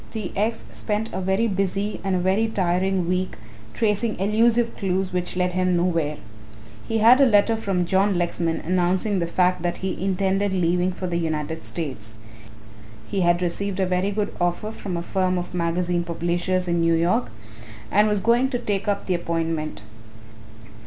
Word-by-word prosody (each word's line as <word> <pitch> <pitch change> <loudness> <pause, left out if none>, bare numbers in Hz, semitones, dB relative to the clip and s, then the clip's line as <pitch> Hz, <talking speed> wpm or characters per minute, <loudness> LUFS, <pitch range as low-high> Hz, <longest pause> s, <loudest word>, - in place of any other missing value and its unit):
T. 215 -5 -4
X. 220 +3 -1
spent 215 +1 -3
a - - -2
very 190 +4 +1
busy 195 +1 -2
and 195 -1 0
a - - +1
very 190 +5 +2
tiring 185 -2 0
week 185 +1 -1 0.4
tracing 215 +1 0
elusive 230 +4 +2
clues 190 -1 -1
which 180 0 -2
led 180 0 0
him 185 -1 +1
nowhere. 165 -4 0 0.7
He 225 - 0
had 235 +5 +6
a - - +8
letter 220 0 +4
from 195 -5 -1
John 190 +2 +2
Lexman 170 -1 -1
announcing 185 +3 +1
the 170 - -1
fact 180 +1 +1
that 175 0 -2
he 190 - -3
intended 195 +1 +1
leaving 180 0 +1
for 185 +1 -6
the 170 -1 -1
United 160 -1 -3
States. 110 -10 -5 0.9
He 195 - -2
had 175 0 +2
received 195 +2 -2
a 190 - +3
very 180 +2 0
good 205 0 -2
offer 175 +5 0
from 190 -5 -5
a 170 - -3
firm 185 0 0
of 180 0 -5
magazine 175 0 0
publishers 175 +2 -1
in 170 -1 +1
New 165 0 +3
York 165 -7 +1 0.6
and 210 +2 +4
was 210 -2 +1
going 235 +4 +3
out 265 - -2
to - - +2
take 205 -4 -2
up 200 -1 0
the 185 - 0
appointment. 165 -5 -2
185 Hz, 175 wpm, -23 LUFS, 175-200 Hz, 0.9 s, a